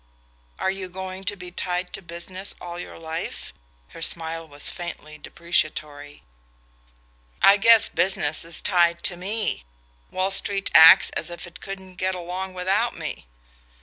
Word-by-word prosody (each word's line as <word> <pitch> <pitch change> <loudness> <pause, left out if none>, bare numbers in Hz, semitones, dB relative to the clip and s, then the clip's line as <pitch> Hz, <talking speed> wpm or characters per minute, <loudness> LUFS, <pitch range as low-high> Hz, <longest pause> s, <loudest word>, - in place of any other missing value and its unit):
"Are 190 - 0
you 190 -1 -5
going 190 +1 -7
to 205 - -1
be 180 -2 -8
tied 180 0 -3
to - - -3
business 185 +2 -5
all 175 0 -7
your - - -9
life?" 160 0 -6 0.4
Her - - -12
smile 165 0 -1
was 145 -1 -1
faintly 155 -3 -6
depreciatory. 150 -3 -2 1.2
"I 200 +1 +6
guess 225 +1 +6
business 160 -5 0
is 165 0 -3
tied 170 -3 +2
to 180 - +2
ME: 200 - -2 0.5
Wall 185 +1 -1
Street 195 0 0
acts 165 +4 +9
as - - -4
if 175 +1 -7
it 175 +1 -13
couldn't 190 -2 -8
get 185 0 -1
along 185 +2 -5
without 195 +6 0
me." 155 - -5
180 Hz, 150 wpm, -24 LUFS, 165-190 Hz, 1.2 s, acts